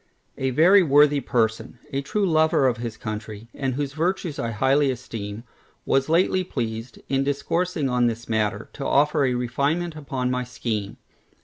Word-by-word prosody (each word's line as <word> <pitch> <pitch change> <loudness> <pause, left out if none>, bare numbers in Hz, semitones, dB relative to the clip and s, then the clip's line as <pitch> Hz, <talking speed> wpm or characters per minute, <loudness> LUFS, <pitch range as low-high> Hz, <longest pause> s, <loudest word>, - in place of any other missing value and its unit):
A 130 - 0
very 175 +10 +6
worthy 145 -2 +5
person, 115 -1 -1 0.2
a 135 - 0
true 200 +9 -1
lover 160 -3 +3
of 120 -2 0
his 115 -2 -5
country, 110 0 -6
and 135 -2 -2
whose 140 -1 -3
virtues 165 -1 -2
I 115 - -1
highly 135 +5 +2
esteem, 115 -4 -5 0.4
was 135 +2 +1
lately 185 +3 +3
pleased 115 -7 -4
in 135 0 +1
discoursing 155 +3 -1
on 125 -1 +2
this 115 0 -4
matter, 110 -1 -1
to 140 - -6
offer 145 +1 +3
a 125 -1 +1
refinement 140 +8 -1
upon 135 -4 -3
my 125 0 -1
scheme. 110 -5 -4
135 Hz, 165 wpm, -24 LUFS, 115-150 Hz, 0.4 s, very